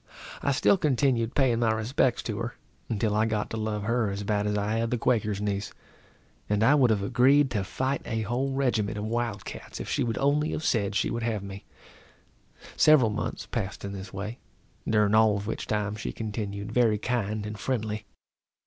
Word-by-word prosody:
I 140 - +1
still 140 +8 +3
continued 130 -5 +1
paying 125 -4 +3
my 115 -2 +3
respects 115 +3 +1
to 110 -2 -3
her, 120 +1 -4 0.3
until 110 -1 0
I 110 +1 +2
got 105 -2 -2
to 110 - -3
love 110 -1 -2
her 115 0 +1
as 100 +1 -4
bad 105 0 0
as 105 0 0
I 105 +2 0
had 115 0 0
the 125 - 0
Quaker's 110 -4 +1
niece; 100 -1 -2 0.8
and 105 +1 +2
I 130 +5 +6
would 135 -5 +5
have 105 -3 +1
agreed 135 +6 +4
to 105 -4 0
fight 130 +7 -2
a 110 -1 -2
whole 125 +5 -1
regiment 115 -6 0
of 105 - -3
wild 115 -3 -2
cats - - -8
if - - -5
she - - 0
would 115 -2 -2
only 150 +2 +1
have 155 - -3
said 105 -7 +1
she 100 - +1
would 115 - -2
have 110 -3 -1
me. 100 +1 -8 1.1
Several 140 -8 +5
months 105 - -3
passed 100 -4 -4
in 100 - -4
this 95 -1 -7
way, 105 +5 -5 0.5
during 105 -1 +3
all 110 -2 +5
of 100 - -5
which 110 - -4
time 105 -1 -1
she 110 - -4
continued 105 -2 -4
very 115 -4 +3
kind 110 -2 -2
and 105 0 -6
friendly. 110 -3 -2
110 Hz, 200 wpm, -27 LUFS, 105-120 Hz, 1.1 s, I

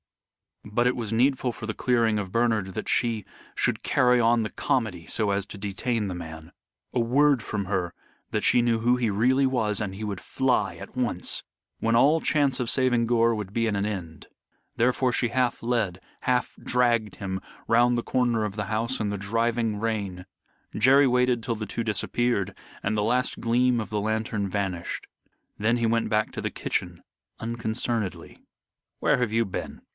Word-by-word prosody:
But 120 +4 +1
it 125 - +2
was 115 -3 -3
needful 130 +1 +2
for 110 - -8
the 110 - -3
clearing 115 -3 +2
of 100 -3 -4
Bernard 110 -5 +1
that - - -4
she 115 -3 +1 0.3
should - - 0
carry 125 -1 +3
on 115 0 +4
the 110 - -2
comedy 105 -10 -1
so 110 -2 0
as 100 -1 0
to 105 - -8
detain 105 +2 -2
the 90 - -4
man. 80 -1 -8 0.4
A - - +1
word 135 +3 +3
from 105 -2 -3
her, 95 -3 -1 0.4
that - - -1
she 120 - +5
knew 120 -1 +2
who 120 +2 +3
he 120 -3 0
really 125 +7 +3
was, 110 -6 +1
and 100 -3 -3
he 100 +3 -7
would 100 -3 -3
fly 130 -1 0
at - - -10
once 120 -9 0 0.4
when 115 +1 +1
all 150 +7 +5
chance 140 -4 +2
of 125 -2 -1
saving 125 -3 +2
Gore 115 0 +3
would 105 -2 -6
be 115 0 +1
at 105 - 0
an 100 0 0
end. 90 -7 -5 0.5
Therefore 125 +2 +2
she 120 - +1
half 125 0 0
led, 110 -7 0 0.2
half 125 -1 0
dragged 120 -4 +1
him 95 -2 -4 0.3
round 120 +1 +4
the 120 - -1
corner 120 -3 +1
of 105 -2 -3
the 105 -1 -2
house 115 +4 -1
in 105 - -1
the 100 - -2
driving 115 +1 0
rain. 100 -5 -3 0.5
Jerry 135 +5 +5
waited 125 -1 +2
till 115 -1 -1
the 110 -1 -5
two 115 - -3
disappeared 105 -1 0 0.3
and 110 +2 -1
the 105 - +1
last 125 +4 0
gleam 120 +1 +2
of 110 - -4
the 105 -1 -1
lantern 110 -1 -1
vanished. 95 -3 -3 0.5
Then 115 +3 +2
he 120 - 0
went 115 0 +1
back 110 0 +1
to - - -5
the - - -2
kitchen - - -3 0.4
unconcernedly. 115 -2 -3 0.6
"Where - - +3
have 125 -3 0
you 115 0 +3
been?" 95 - -6
115 Hz, 185 wpm, -26 LUFS, 105-120 Hz, 0.6 s, she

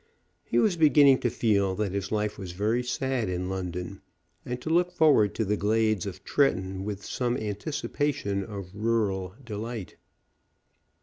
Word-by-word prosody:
He - - -1
was 200 -5 +3
beginning 145 -4 +6
to 120 - +1
feel 100 -5 +1
that 105 -2 -1
his 100 -1 -3
life 105 -1 -1
was 90 -3 -6
very 110 +6 +1
sad 125 -2 -1
in 90 0 -2
London, 90 0 -5 0.4
and 125 0 -4
to 155 - -5
look 175 +1 +3
forward 150 - +4
to 110 - 0
the 105 +2 +1
glades 110 -1 +1
of 95 0 -7
Tretton 95 -9 +1
with 100 -1 -5
some 125 -1 -1
anticipation 110 0 -2
of 100 -2 -7
rural 105 -4 -1
delight. 110 -2 -6
105 Hz, 150 wpm, -27 LUFS, 95-125 Hz, 0.4 s, beginning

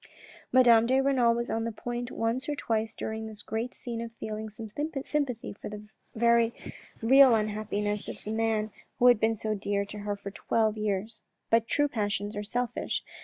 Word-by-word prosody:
Madame 235 -3 +6
de 260 +2 +3
Renal 265 -3 +3
was 235 +1 -2
on 225 - -1
the 230 - -2
point 240 +2 -4
once 235 +4 -2
or 295 - 0
twice 225 -4 -1
during 220 0 -4
this 215 -1 -9
great 225 +3 -3
scene 235 -2 -5
of 230 0 -6
feeling 220 -1 -5
some 215 0 -9 0.3
sympathy 275 -7 -2
for 205 - -8
the 210 0 -8 0.3
very 235 0 +4 0.5
real 265 +1 +7
unhappiness 210 -1 -2
of - - -8
the 215 - -4
man 220 -1 0 0.3
who 245 - +2
had 245 -3 +7
been 225 +1 +2
so 215 0 -2
dear 200 0 -1
to 210 +1 -8
her 205 0 -2
for 200 0 -8
twelve 220 +1 +1
years. 215 +1 -2 0.3
But 230 0 +4
true 290 0 +2
passions 205 -4 -2
are 205 - -2
selfish. 245 +3 -2
225 Hz, 185 wpm, -29 LUFS, 210-235 Hz, 0.5 s, real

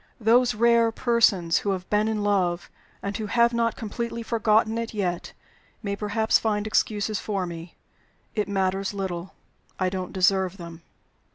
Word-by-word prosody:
Those 240 +2 +3
rare 235 0 +4
persons 220 -9 +2
who 205 - -3
have 185 -1 -5
been 210 +1 +2
in 215 -2 -1
love, 180 -4 0 0.3
and 200 0 -3
who 215 -1 -3
have 235 +2 +3
not 230 -1 +1
completely 235 0 -4
forgotten 220 0 +2
it 230 -1 -5
yet, 180 -4 -2 0.5
may 200 -1 -2
perhaps 215 +2 +1
find 210 -2 -1
excuses 215 -1 0
for 200 -3 -2
me. 170 0 -8 0.6
It 210 -2 -1
matters 195 0 -1
little; 190 -2 -4 0.4
I 185 -1 +1
don't 185 -1 -4
deserve 190 0 +2
them. 170 -2 -10
205 Hz, 155 wpm, -25 LUFS, 185-225 Hz, 0.6 s, rare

